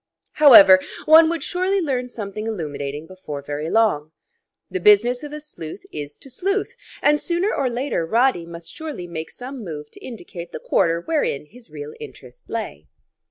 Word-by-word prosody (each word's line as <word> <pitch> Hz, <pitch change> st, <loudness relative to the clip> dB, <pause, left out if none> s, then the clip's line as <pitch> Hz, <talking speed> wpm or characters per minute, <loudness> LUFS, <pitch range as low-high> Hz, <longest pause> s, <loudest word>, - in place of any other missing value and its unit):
However, 200 Hz, -11 st, +9 dB, 0.3 s
one 320 Hz, +1 st, +7 dB
would 335 Hz, -1 st, -2 dB
surely 370 Hz, +2 st, 0 dB
learn 260 Hz, -7 st, -2 dB
something 215 Hz, -2 st, -6 dB
illuminating 150 Hz, -7 st, -4 dB
before 160 Hz, -6 st, -8 dB
very 145 Hz, +2 st, -4 dB
long. 160 Hz, -9 st, +1 dB, 0.5 s
The 185 Hz, -, -4 dB
business 210 Hz, +6 st, +4 dB
of 295 Hz, -1 st, -8 dB
a 300 Hz, -, -6 dB
sleuth 205 Hz, -, -10 dB
is 145 Hz, -1 st, -6 dB
to 270 Hz, -, -12 dB
sleuth, 395 Hz, -, -2 dB, 0.3 s
and 295 Hz, 0 st, +4 dB
sooner 350 Hz, +4 st, 0 dB
or 270 Hz, -3 st, 0 dB
later 245 Hz, -6 st, -2 dB
Roddy 225 Hz, -1 st, +1 dB
must 170 Hz, 0 st, -10 dB
surely 305 Hz, -, -6 dB
make 160 Hz, -2 st, -6 dB
some 255 Hz, -1 st, -8 dB
move 150 Hz, -5 st, -7 dB
to -, -, -15 dB
indicate 175 Hz, -7 st, -9 dB
the -, -, -5 dB
quarter 165 Hz, 0 st, +1 dB
wherein 285 Hz, -, -1 dB
his 235 Hz, +8 st, -16 dB
real 445 Hz, +1 st, -8 dB
interest 455 Hz, +2 st, -13 dB
lay. -, -, -5 dB
225 Hz, 165 wpm, -22 LUFS, -, 0.5 s, However